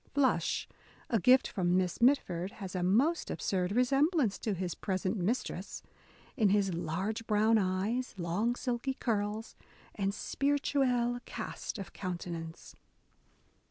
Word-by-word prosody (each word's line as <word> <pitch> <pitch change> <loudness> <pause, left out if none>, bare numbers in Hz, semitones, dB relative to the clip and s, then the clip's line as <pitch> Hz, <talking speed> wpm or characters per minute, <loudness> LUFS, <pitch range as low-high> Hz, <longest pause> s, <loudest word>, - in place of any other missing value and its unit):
Flush, 260 - +2 0.4
a 225 - +3
gift 255 +7 +5
from 180 -3 +1
Miss 185 +3 -1
Mitford, 200 -8 +2
has 190 -4 -7
a 185 - -1
most 245 - +2
absurd 185 -1 -1
resemblance 270 - +2
to 210 -3 -1
his 180 -1 -3
present 190 0 -2
mistress, 215 +6 -2 0.3
— - - -27
in 215 -6 +3
his 195 -2 +2
large 185 +7 -3
brown 220 +1 +4
eyes, 200 +7 -1
long 190 +8 0
silky 250 +1 -2
curls, 215 -1 -2 0.4
and 195 -1 -1
spirituelle 255 -1 +1
cast - - -5
of 195 -3 -7
counten 175 -2 -4
ance. 165 0 -9
210 Hz, 130 wpm, -32 LUFS, 185-245 Hz, 0.4 s, gift